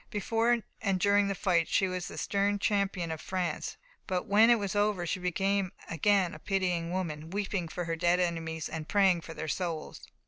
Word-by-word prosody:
Before 230 +2 +1 0.2
and 195 -3 +1
during 200 +2 +4
the 195 - -1
fight 175 -3 +2
she 190 - +2
was 185 -1 -3
the - - -8
stern 200 0 +1
champion 195 -4 0
of 160 - -5
France; 185 -2 -3 0.3
but 180 -1 -1
when 215 +3 +5
it 240 - +7
was 200 -2 -3
over 205 -3 +1
she 180 +3 -2
became 195 +1 0 0.2
again 185 +2 +2
a - - -9
pitying 180 -4 -1
woman, 160 -4 -3
weeping 195 -2 -2
for 175 +2 -4
her 165 0 -1
dead 175 +2 +2
enemies, 165 -2 -2
and 160 -1 -6
praying 190 -4 +4
for 165 0 -9
their 160 - -5
souls. 165 -1 -3
185 Hz, 195 wpm, -30 LUFS, 170-200 Hz, 0.3 s, it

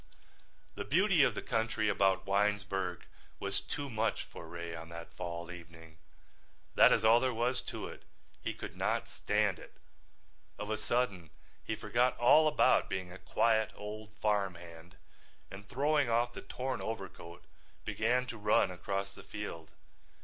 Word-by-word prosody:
The 100 - -4
beauty 180 - +4
of 135 - +4
the - - -4
country 110 -1 0
about 95 -2 +2
Winesburg 95 -3 0 0.3
was - - 0
too 145 - -4
much 110 -3 -1
for 85 - -11
Ray 85 0 -6
on 80 0 -8
that 85 0 -9
fall 85 -1 -5
evening. 80 -2 -12 0.7
That - - +7
is 110 - +3
all 115 +2 +7
there 130 +1 +1
was 125 +2 +1
to - - -5
it. - - -10 0.4
He - - -3
could - - -7
not - - 0
stand 105 -4 0
it. - - -13 0.8
Of 105 +1 -4
a 110 - 0
sudden 105 -8 -1 0.3
he - - -2
forgot 125 +2 +1
all 155 +6 +6
about 150 - +4
being 95 -1 -3
a 95 - -10
quiet 110 -2 +2
old 105 +1 -7
farm 100 -4 +1
hand 85 +1 -12 0.6
and 100 +1 -10
throwing 145 0 +2
off 120 +1 +2
the - - -7
torn 130 +1 -4
overcoat 95 -5 -6 0.4
began 125 +3 +1
to 120 -3 -7
run 105 -2 +3
across 100 +2 -3
the - - -12
field. 85 -7 -7
105 Hz, 155 wpm, -33 LUFS, 90-120 Hz, 0.8 s, That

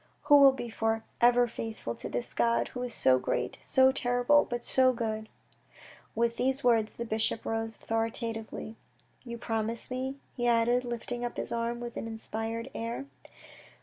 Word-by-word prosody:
You 290 - +8
will 275 -1 +8
be 260 -2 -5
for 225 0 0 0.2
ever 245 +1 +6
faithful 225 - -5
to - - -7
this 120 0 -4
God 115 0 +2
who 250 - -6
is 250 -1 -3
so 130 - +3
great, - - -2
so 260 0 +4
terrible, 245 +3 +3
but 240 0 -3
so 260 -1 +4
good? 220 -2 -3 0.4
" - - -21
With 235 +1 +1
these 265 +2 0
words 225 -3 +3
the 235 - -5
bishop 220 0 -1
rose 225 0 -2
authoritatively. 225 0 -3 0.2
" - - -31
You 235 -1 -6
promise 225 +1 -3
me? 260 +1 -2
" - - -37
he 240 - -2
said, 240 +1 +3
lifting 240 0 -4
up 240 - -4
his - - -3
arm 235 0 -1
with 240 -1 -6
an - - -4
inspired 225 +1 -4
air. 230 +4 -4
235 Hz, 180 wpm, -30 LUFS, 225-245 Hz, 0.4 s, You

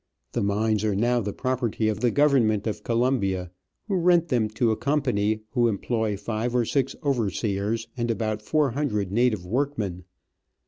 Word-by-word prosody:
The - - -1
mines 105 +1 +1
are 105 -2 +1
now 120 +4 +2
the 105 -1 -3
property 120 -3 -1
of 110 -1 -1
the 120 - +2
Government 120 -7 +3
of 105 -1 -3
Colombia, 115 -7 0 0.4
who 195 -3 0
rent 175 -1 +3
them 120 -4 +2
to 110 +2 +1
a - - +1
com 145 +5 0
pany 110 -4 0
who 120 -2 +3
employ 110 -1 -1
five 110 +4 -3
or 120 -2 +3
six 135 +2 0
overseers 110 -4 -1
and 120 -2 -2
about 110 -2 -1
four 145 +4 +1
hundred 105 -8 -1
native 110 -4 +1
workmen. 105 -6 -2
115 Hz, 170 wpm, -25 LUFS, 105-130 Hz, 0.4 s, Government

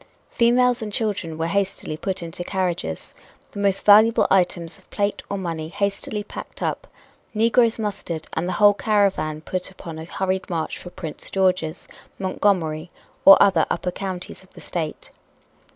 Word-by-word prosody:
Females 245 +1 +3
and 215 -1 -4
children 200 -7 -2
were 160 - -1
hastily 195 -3 -1
put 185 +3 -3
into 170 +1 -6
carriages, 175 - -3 0.4
the - - -7
most 200 -1 +1
valuable 215 +2 +7
items 175 -2 +1
of 185 - -26
plate 205 0 -1
or 200 - -2
money 165 -4 -4
hastily 200 +2 -2
packed - - -8
up, - - -2 0.5
negroes 230 +1 +3
mustered 195 -7 -4
and 165 +2 -1
the 185 - -1
whole 205 -1 +6
caravan 195 -8 +1
put 185 +3 -3
upon 165 -4 -9
a 160 - -7
hurried 190 +3 -2
march 165 -3 -3
for 175 - -9
Prince 160 -4 -6
George's, 185 -4 0 0.3
Montgomery 180 -4 0 0.4
or 195 - +11
other 180 -5 +4
upper 180 +1 -1
counties 185 -1 -6
of 190 - -21
the - - -13
State. 160 -3 -5
190 Hz, 155 wpm, -23 LUFS, 165-205 Hz, 0.5 s, or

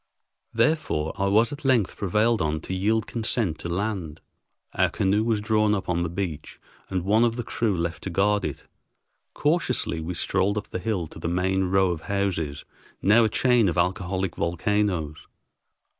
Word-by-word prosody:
Therefore 115 - +1
I 100 -1 0
was 110 +6 +3
at 145 - -9
length 125 -8 +2
prevailed 105 +3 +1
on 75 0 0
to 95 - -5
yield 105 +4 +1
consent 110 -6 -2
to 85 - -5
land. 90 -4 -3 0.5
Our - - +2
canoe 100 +3 +1
was 115 -2 +1
drawn 105 0 +2
up 95 - -4
on 85 -1 0
the 85 - -1
beach 85 -3 -5 0.3
and 95 -2 -1
one 110 +4 +4
of 115 -1 +2
the 120 - -3
crew 110 -4 -1
left 85 0 -3
to - - -2
guard 100 +3 +2
it. 75 - -5 0.7
Cautiously 145 - 0
we 85 +3 -4
strolled 95 +5 0
up 105 - -4
the - - -4
hill 95 -4 -1
to 80 - -12
the 80 - -3
main 95 +2 +1
row 95 0 +2
of 85 -2 -4
houses, 85 -5 -2 0.4
now 110 +4 +6
a - - +1
chain 120 -2 +3
of 85 - -3
alcoholic 90 0 -1
volcanoes. 85 -2 -1
95 Hz, 175 wpm, -25 LUFS, 85-110 Hz, 0.7 s, now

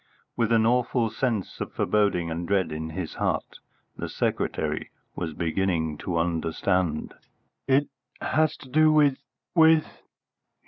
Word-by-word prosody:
With 115 -1 +1
an 110 -1 +4
awful 120 -1 +2
sense 110 -4 -2
of - - -4
foreboding 100 -6 +1
and 85 +1 -3
dread 95 -4 +1
in 80 +1 -4
his 80 0 -5
heart, - - -2 0.4
the - - -5
secretary - - -2 0.3
was 80 -3 -4
beginning 85 -3 -1
to 85 -2 -2
understand. 85 0 0 0.5
"It 140 +2 +3 0.3
has 155 -2 +1
to - - -11
do 155 +3 +5
with 145 -3 +4 0.3
with 160 -2 +4
100 Hz, 130 wpm, -26 LUFS, 85-130 Hz, 0.5 s, do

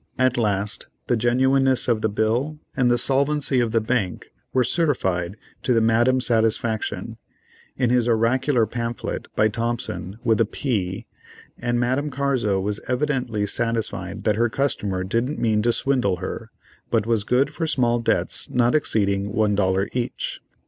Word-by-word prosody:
At 130 -1 +2
last 105 -3 -1 0.2
the 120 - +1
genuineness 130 +3 +2
of 115 -3 +1
the 110 - +1
bill 115 +9 0 0.2
and 125 -2 +2
the 120 - +3
solvency 140 +1 +2
of 120 -2 +1
the 115 - +3
bank 110 -5 -2 0.2
were 130 - +3
certified 100 - 0 0.2
to 125 - +1
the - - +5
Madame's 120 +3 +3
satisfaction, 115 -1 0 0.6
in 125 -2 +1
his 125 -1 +2
oracular 120 +2 +2
pamphlet, 115 +2 -4
by 110 - +4
Thompson 110 -5 -3
with 115 -2 +2
a - - +4
"p," 100 -6 -2 0.5
and 120 0 0
Madame 130 +5 0
Carzo 130 -8 0
was 100 +2 -2
evidently 125 -5 -1
satisfied 110 -4 -2
that 105 -1 +1
her 120 +1 +2
customer 105 -7 -1
didn't 115 +9 -1
mean 110 -2 +1
to 120 +2 +2
swindle 125 -7 +1
her, - - -6 0.4
but 110 -3 +1
was 115 -3 +1
good 125 +5 +1
for 165 - -2
small 120 -5 +1
debts 115 - +1
not 120 0 +2
exceeding 100 -8 +1
one 105 0 +1
dollar 95 0 +1
each. 125 -1 -3
115 Hz, 155 wpm, -23 LUFS, 105-130 Hz, 0.6 s, the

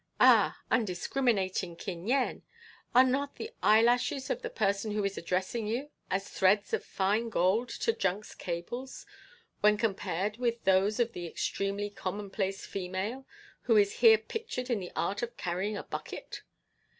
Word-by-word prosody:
Ah, - - +6
undiscriminating 195 -4 0
Kin 175 +1 -6
Yen! 260 +1 +1 0.5
are 255 - +9
not 275 +2 0
the 450 - -6
eyelashes 240 - +3
of - - -2
the - - -4
person 200 - 0
who 210 -1 0
is 200 0 -1
addressing 185 +6 -2
you 260 +7 -3 0.2
as 195 +1 -1
threads 200 +2 +2
of - - 0
fine 210 +4 0
gold 215 +5 +2
to 455 - 0
junk's 195 - -2
cables 200 +10 -5 0.5
when 210 0 +4
compared 205 -1 -1
with 235 -1 -1
those 195 +4 +3
of 235 -1 +1
the 175 -1 -5
extremely 200 +4 -2
commonplace 195 0 -3
female 195 +8 -4 0.4
who 225 - +6
is 200 -1 +3
here 225 -2 +8
pictured 255 - -5
in 230 - +1
the 180 -2 -7
art 170 +5 -1
of 240 0 -5
carrying 190 +3 -2
a - - -5
bucket? - - -7
210 Hz, 150 wpm, -30 LUFS, 190-240 Hz, 0.5 s, are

